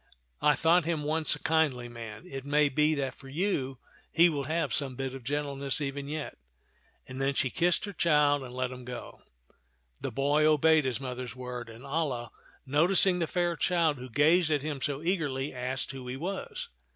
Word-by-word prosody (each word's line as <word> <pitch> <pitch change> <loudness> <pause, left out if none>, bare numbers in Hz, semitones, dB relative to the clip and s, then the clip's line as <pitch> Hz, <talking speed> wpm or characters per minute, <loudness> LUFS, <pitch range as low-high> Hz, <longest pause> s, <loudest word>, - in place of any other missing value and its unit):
I 150 -1 +5
thought 165 +4 +4
him 160 -3 -1
once 155 +1 +2
a - - -11
kindly 145 -7 +1
man; 115 +3 -9
it 135 -6 -7
may 145 +1 +3
be 150 +3 +2
that 135 -3 -2
for 135 - -14
you 140 -5 -1 0.3
he 170 +1 +6
will 145 -4 -2
have 160 +3 -1
some 135 -3 0
bit 135 0 -3
of 135 -2 -8
gentle 145 +2 -2
ness 140 0 0
even 140 -1 -3
yet 150 0 -5 0.3
"; - - -37
and 130 +1 -6
then 135 0 +1
she 130 -3 +1
kissed 175 +3 +1
her 200 - -6
child 150 -5 +3
and 130 -2 -8
let 130 0 -2
him 125 0 -8
go. 125 0 -8 0.8
The - - -2
boy 145 +2 +2
obeyed 155 0 +4
his 130 -2 -1
mother's 125 -2 -5
word; 125 -2 -6
and 115 +2 -12
Alia, 140 -5 -2 0.3
no 145 +5 +3
ticing 190 -1 +4
the 165 - 0
fair 175 0 0
child 165 -4 +1
who 130 +1 -8
gazed 160 +7 +4
at 150 -3 +1
him 150 -3 -4
so 145 +2 -2
eagerly, 150 -6 -1
asked 130 +2 -3
who 130 -2 -8
he 125 +1 -4
was. 185 +6 -4
145 Hz, 200 wpm, -29 LUFS, 130-160 Hz, 0.8 s, he